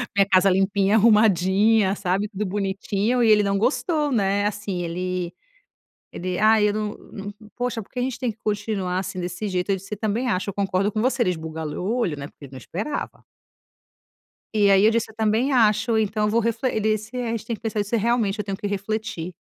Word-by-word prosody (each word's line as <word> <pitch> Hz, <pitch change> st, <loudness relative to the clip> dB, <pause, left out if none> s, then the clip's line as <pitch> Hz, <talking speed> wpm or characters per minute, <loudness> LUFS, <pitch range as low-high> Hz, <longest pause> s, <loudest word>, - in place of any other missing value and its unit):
Minha 200 Hz, -1 st, +5 dB
casa 190 Hz, +1 st, +5 dB
limpinha, 195 Hz, +2 st, +2 dB
arrumadinha, 210 Hz, -1 st, +4 dB
sabe, 195 Hz, +2 st, -1 dB
tudo 210 Hz, 0 st, -3 dB
bonitinho 200 Hz, +4 st, -1 dB
e 225 Hz, -, +4 dB
ele 210 Hz, -1 st, +6 dB
não 200 Hz, 0 st, +1 dB
gostou, 295 Hz, -, 0 dB
né, 200 Hz, -2 st, +1 dB
assim 205 Hz, -3 st, -3 dB
ele 180 Hz, +1 st, -3 dB, 0.8 s
ele: 180 Hz, 0 st, -3 dB
"Ai, 215 Hz, -1 st, +5 dB
eu -, -, -1 dB
não 215 Hz, -1 st, -2 dB, 0.2 s
não 200 Hz, -1 st, -8 dB
n 210 Hz, +1 st, -11 dB
poxa, 245 Hz, -2 st, -2 dB
porque 250 Hz, +5 st, -8 dB
a -, -, 0 dB
gente 255 Hz, -1 st, -2 dB
tem 245 Hz, -3 st, -1 dB
que -, -, -32 dB
continuar, 205 Hz, -3 st, -1 dB
assim, 190 Hz, -, -5 dB
desse 180 Hz, +4 st, -4 dB
jeito?" 180 Hz, +1 st, -2 dB
Eu -, -, +3 dB
disse: 195 Hz, +3 st, -7 dB
"Também 220 Hz, +4 st, -1 dB
acho. 185 Hz, 0 st, -1 dB
Eu -, -, -4 dB
concordo 195 Hz, 0 st, 0 dB
com 215 Hz, -, -1 dB
você." 255 Hz, 0 st, +1 dB
Ele 180 Hz, -, +1 dB
esbugalhou 160 Hz, +1 st, -5 dB
olho, 170 Hz, -11 st, -1 dB
né, 140 Hz, 0 st, -6 dB
porque 145 Hz, -, -14 dB
ele 135 Hz, -, -14 dB
não -, -, -8 dB
esperava. 210 Hz, -, -5 dB, 1.3 s
E 205 Hz, -2 st, +4 dB
aí 195 Hz, +1 st, +5 dB
eu 220 Hz, -, +6 dB
disse: 230 Hz, -1 st, -1 dB
"Eu -, -, -17 dB
também 225 Hz, +5 st, +1 dB
acho. 225 Hz, -1 st, +3 dB
Então 215 Hz, 0 st, 0 dB
eu 210 Hz, -, +2 dB
vou 230 Hz, +2 st, +2 dB
refle 230 Hz, +3 st, 0 dB
"ele 220 Hz, -, -1 dB
disse: 215 Hz, +4 st, -4 dB
"É, 245 Hz, -2 st, -2 dB
a -, -, -2 dB
gente 225 Hz, -1 st, -4 dB
tem 230 Hz, -, -2 dB
que -, -, -26 dB
pensa 215 Hz, -2 st, -1 dB
se, 210 Hz, +3 st, -1 dB
realmente, 225 Hz, -2 st, +1 dB
eu 210 Hz, -, -2 dB
tenho 195 Hz, -1 st, -3 dB
que 205 Hz, -, -5 dB
refletir." 200 Hz, -3 st, -3 dB
210 Hz, 220 wpm, -23 LUFS, 190-225 Hz, 1.3 s, ele